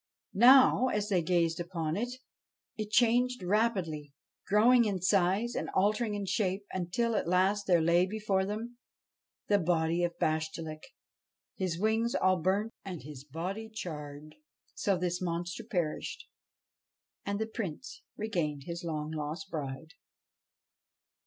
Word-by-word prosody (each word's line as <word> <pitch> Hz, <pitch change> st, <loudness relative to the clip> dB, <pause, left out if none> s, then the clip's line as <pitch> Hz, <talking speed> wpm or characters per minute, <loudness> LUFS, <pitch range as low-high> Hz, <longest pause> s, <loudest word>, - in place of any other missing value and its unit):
Now, 255 Hz, +3 st, +7 dB
as 210 Hz, -3 st, -1 dB
they 185 Hz, -4 st, +2 dB
gazed 165 Hz, -1 st, +1 dB
upon 170 Hz, -3 st, -3 dB
it, 240 Hz, +5 st, -1 dB, 0.7 s
it 215 Hz, -1 st, -4 dB
changed 245 Hz, 0 st, +3 dB
rapidly, 180 Hz, -8 st, 0 dB, 0.3 s
growing 235 Hz, +4 st, +5 dB
in 200 Hz, -3 st, -1 dB
size 195 Hz, +5 st, +2 dB
and -, -, -3 dB
altering 210 Hz, +3 st, +2 dB
in 200 Hz, -1 st, -3 dB
shape, 195 Hz, 0 st, -1 dB
until 190 Hz, +6 st, -1 dB
at 200 Hz, -, 0 dB
last 190 Hz, +3 st, +2 dB
there 175 Hz, -3 st, +4 dB
lay 170 Hz, +2 st, +4 dB
before 205 Hz, -2 st, 0 dB
them 225 Hz, +5 st, -5 dB, 0.7 s
the 205 Hz, -1 st, +3 dB
body 170 Hz, 0 st, +1 dB
of 170 Hz, -1 st, -1 dB
Bashtchelik, 155 Hz, 0 st, -2 dB, 0.7 s
his 185 Hz, -3 st, -2 dB
wings 220 Hz, +3 st, +1 dB
all 185 Hz, 0 st, +3 dB
burnt 200 Hz, +6 st, 0 dB
and 180 Hz, -7 st, -7 dB
his 140 Hz, -2 st, -9 dB
body 180 Hz, +10 st, -5 dB
charred. 150 Hz, -7 st, -7 dB, 0.4 s
So 195 Hz, -2 st, 0 dB
this 180 Hz, 0 st, -2 dB
monster 175 Hz, +4 st, -3 dB
perished, 205 Hz, -, -3 dB, 1.0 s
and 200 Hz, 0 st, -2 dB
the 220 Hz, -, -1 dB
Prince 220 Hz, -, -6 dB, 0.2 s
regained 170 Hz, -10 st, -2 dB
his 170 Hz, +1 st, -5 dB
long 155 Hz, -2 st, -3 dB
lost 160 Hz, +5 st, -5 dB
bride. 150 Hz, +1 st, -5 dB
185 Hz, 135 wpm, -31 LUFS, 165-215 Hz, 1.0 s, Now